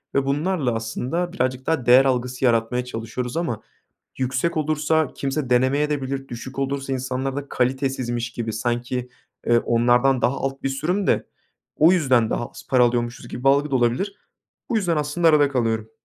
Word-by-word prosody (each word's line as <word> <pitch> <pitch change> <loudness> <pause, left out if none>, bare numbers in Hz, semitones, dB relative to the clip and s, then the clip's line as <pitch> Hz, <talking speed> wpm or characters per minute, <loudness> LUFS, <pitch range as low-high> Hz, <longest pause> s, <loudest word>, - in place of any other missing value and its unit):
ve 140 0 +2
bunlarla 145 -2 0
aslında 130 +10 -3
birazcık 130 -6 -1
daha 160 -7 0
değer 125 +2 +7
algısı 125 0 0
yaratmaya 120 +1 +1
çalışıyoruz 120 +2 -5
ama 145 -11 -2 0.6
yüksek 130 +6 -1
olursa 155 0 +1
kimse 135 -1 -3
denemeyebilir 135 +2 +1
de, 135 - -18
düşük 125 +3 -8
olursa 135 0 -2
insanlarda 130 +2 -3
kalitesizmiş 125 -2 -1
gibi 115 -2 -4
sanki, 120 +2 -2 0.4
ııı, 120 0 +5
onlardan 120 +3 +3
daha 135 - +2
alt 135 0 -4
bir - - 0
sürüm 175 +9 -1
de - - +1 0.5
o 160 +4 +6
yüzden 130 -10 +3
daha 120 - -1
az - - -13
para 125 -2 +5
alıyormuşuz 120 0 -1
gibi 125 - -7
bir - - +5
algı 140 +2 +3
da 135 - +2
olabilir. 125 - 0 0.6
Bu 235 - +1
yüzden 175 -6 +1
aslında 150 +3 +1
arada 150 -2 +5
kalıyorum. 115 -4 -1
130 Hz, 165 wpm, -23 LUFS, 120-145 Hz, 0.6 s, değer